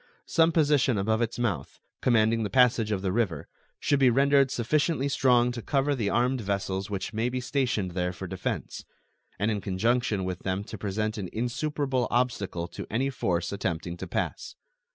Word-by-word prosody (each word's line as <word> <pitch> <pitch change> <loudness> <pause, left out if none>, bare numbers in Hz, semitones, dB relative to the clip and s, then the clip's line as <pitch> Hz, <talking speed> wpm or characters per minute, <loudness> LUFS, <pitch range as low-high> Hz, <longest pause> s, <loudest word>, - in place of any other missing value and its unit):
Some 165 0 +3
position 145 -7 +3
above 110 +3 +1
its 115 0 -1
mouth, 100 - -2 0.2
commanding 115 -2 +3
the 105 - -1
passage 125 -3 +3
of 100 -2 -1
the 95 - 0
river, 95 -8 -1 0.3
should 145 - +1
be 130 -2 +6
rendered 140 +2 +4
sufficiently 140 +4 +1
strong 125 -3 +3
to 120 -1 -5
cover 140 +3 +1
the 110 -7 -1
armed 125 +1 +1
vessels 100 0 -2
which 100 +2 -4
may 115 +3 0
be 125 +1 -2
stationed 120 -7 -1
there 90 0 -1
for 90 - -7
defense, - - -4 0.5
and 105 +3 +1
in 105 -2 -2
conjunction 105 +1 0
with 90 -2 -3
them 95 +1 -2
to 110 - -8
present 105 +2 -2
an 95 -3 -4
insuperable 130 +2 -1
obstacle 105 -8 -1
to - - -7
any 130 +5 0
force 85 -8 -1
attempting 85 -3 -3
to - - -6
pass. - - -3
115 Hz, 175 wpm, -27 LUFS, 100-130 Hz, 0.5 s, be